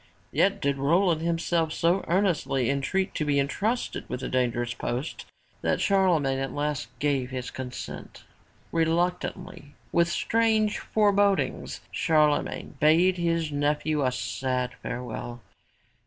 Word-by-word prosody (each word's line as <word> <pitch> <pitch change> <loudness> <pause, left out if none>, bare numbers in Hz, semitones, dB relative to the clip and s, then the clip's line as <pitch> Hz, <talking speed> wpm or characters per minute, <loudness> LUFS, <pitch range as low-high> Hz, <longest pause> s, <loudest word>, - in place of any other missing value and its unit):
'' - - -35
Yet 200 +1 +2
did 140 -1 +1
Roland 165 +3 +3
himself 165 -1 0
so 170 +4 +1
earnestly 150 - +1
entreat 140 +8 -1
to - - -1
be 145 -1 +2
entrusted 210 - -1
with 125 - -4
the - - -3
dangerous 120 -1 0
post 125 +5 -4 0.3
that - - +1
Charlemagne 170 -9 +2
at 135 0 -3
last 145 -1 -2
gave 140 -3 0
his 130 -1 -5
consent. 125 -1 -7 0.5
Reluctantly, 165 -3 -1 0.2
with 170 0 +3
strange 220 +1 +1
forebodings, 205 -2 +1
Charlemagne 150 -2 +1
bade 170 +5 +4
his 165 -2 0
nephew 150 +1 0
a 130 - +2
sad 125 +1 -2
farewell. 120 -1 -5
155 Hz, 125 wpm, -27 LUFS, 135-180 Hz, 0.5 s, bade